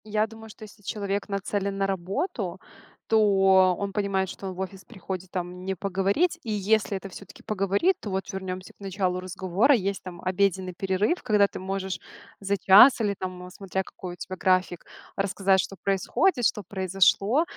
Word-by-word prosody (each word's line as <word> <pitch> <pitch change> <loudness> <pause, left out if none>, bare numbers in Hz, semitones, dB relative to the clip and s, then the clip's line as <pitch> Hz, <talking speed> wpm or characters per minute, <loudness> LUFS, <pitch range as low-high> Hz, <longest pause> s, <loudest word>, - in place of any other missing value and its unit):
Я 215 0 +1
думаю, 225 0 -12
что 215 - -13
если 210 0 -13
человек 200 0 -3
нацелен 200 0 -2
на 195 - +1
работу, 195 - -3 0.5
то 220 - +4 0.6
он 200 0 -3
понимает, 195 -2 0
что 195 - -7
он 190 - -4
в 180 - -11
офис 190 -1 -6
приходит 190 -4 -7
там 180 0 -5
не 190 0 -2
поговорить. 195 - 0
И 225 - -4
если 210 0 +1
это 195 +1 -8
всё-таки 195 0 -12
поговорить, 200 - +1
то 210 - -6
вот 190 +1 -3
вернёмся 185 -1 -5
к - - -33
началу 190 -2 -1
разговора. 185 +7 +2
Есть 195 -1 -2
там 175 -2 -9
обеденный 185 0 0
перерыв, 195 - 0
когда 210 -2 +3
ты - - -8
можешь 190 0 -3 0.4
за 200 0 0
час 205 +8 +7
или 205 -2 +1
там, 180 -1 -6
смотря 190 0 -3
какой 180 -1 -8
у - - -9
тебя 185 +2 -7
график, 185 -2 +1 0.3
рассказать, 195 -1 +2
что 195 - -2
происходит, 210 - +1
что 210 -1 +1
произошло. 195 - +2
195 Hz, 175 wpm, -26 LUFS, 185-205 Hz, 0.6 s, час